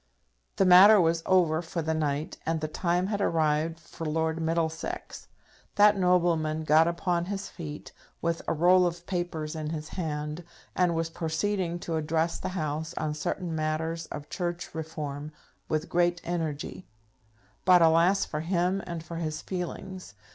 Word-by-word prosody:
The 195 - +3
matter 190 +4 +9
was 165 -1 +2
over 170 -4 +3
for 170 0 -4
the 160 +1 0
night, 150 -1 -2
and 160 0 -1
the 155 - -2
time 175 +3 0
had 205 0 -2
arrived 160 -1 +1
for 165 0 -10
Lord 160 +1 -1
Middlesex. 160 0 -3 0.5
That 205 0 +6
nobleman 170 -4 +2
got 155 +2 +5
upon 170 0 0
his 195 +1 -4
feet, 150 -4 -8 0.3
with 165 0 -1
a - - +1
roll 180 +3 +5
of 175 0 -6
papers 170 -4 -3
in 155 -1 -4
his 155 -1 -5
hand, 150 -1 -4 0.3
and 180 -2 +2
was 165 0 -1
proceeding 175 +2 -1
to 165 -2 -2
address 160 +2 0
the - - -3
House 155 0 -3
on 155 -1 -1
certain 170 +3 -3
matters 160 +1 -2
of 145 0 -7
church 175 -1 -4
reform, 155 -2 -5 0.4
with 155 +1 -1
great 175 0 +2
energy; 165 0 -4 0.8
but, 180 -2 +6
alas, 170 +4 +4
for 150 - -4
him 180 +3 0
and 170 -2 -5
for 170 0 -7
his 155 -2 -3
feelings! 185 - -6
165 Hz, 155 wpm, -28 LUFS, 155-175 Hz, 0.8 s, matter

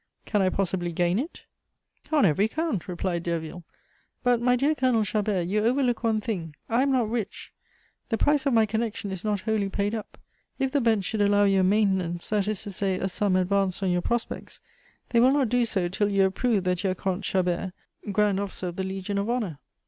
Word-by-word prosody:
"Can 210 - +1
I 190 - +3
possibly 185 -2 -1
gain 175 +4 +1
it?" 305 +7 -6 0.7
"On 300 -6 +4
every 190 +5 +3
count," 310 - -2
replied 175 -1 -2
Derville. 170 0 -4 0.6
"But, 245 -2 +3
my 250 +1 +3
dear 280 +5 +2
Colonel 255 -6 +2
Chabert, 205 -4 0
you 210 +3 +1
overlook 245 0 +1
one 220 -1 +2
thing. 180 -8 -4
I 235 +2 +2
am 275 0 +2
not 250 -4 +2
rich; 220 -3 -4 0.6
the 225 - 0
price 290 +3 +2
of 275 - +2
my 225 -1 +5
connection 220 -2 -3
is 190 -1 -5
not 210 -2 -1
wholly 215 -2 0
paid 200 +2 -1
up. 220 -2 -6 0.4
If 270 -1 0
the 285 0 +1
bench 220 -5 +2
should 215 +2 -1
allow 205 0 +4
you 195 -1 +3
a - - +3
maintenance, 190 -3 +1
that 210 -2 +1
is 215 -3 -1
to 205 - -6
say, 190 -1 -1
a 190 - -1
sum 195 0 0
advanced 190 +1 +1
on 185 - +2
your 180 0 +1
prospects, 240 +4 -3 0.5
they 235 - +3
will 255 +3 +5
not 275 -5 +2
do 245 +1 +2
so 190 -6 0
till 200 +3 0
you 195 -1 +3
have 190 0 +2
proved 215 -4 +1
that 180 -1 0
you 195 - +1
are 185 - -1
Comte 190 +1 -2
Chabert, 185 0 0 0.4
grand 205 -1 +2
officer 190 -2 -4
of 175 - -9
the 190 - -1
Legion 190 +1 -3
of 200 +3 -2
Honor." 215 - -2
205 Hz, 215 wpm, -26 LUFS, 185-230 Hz, 0.7 s, my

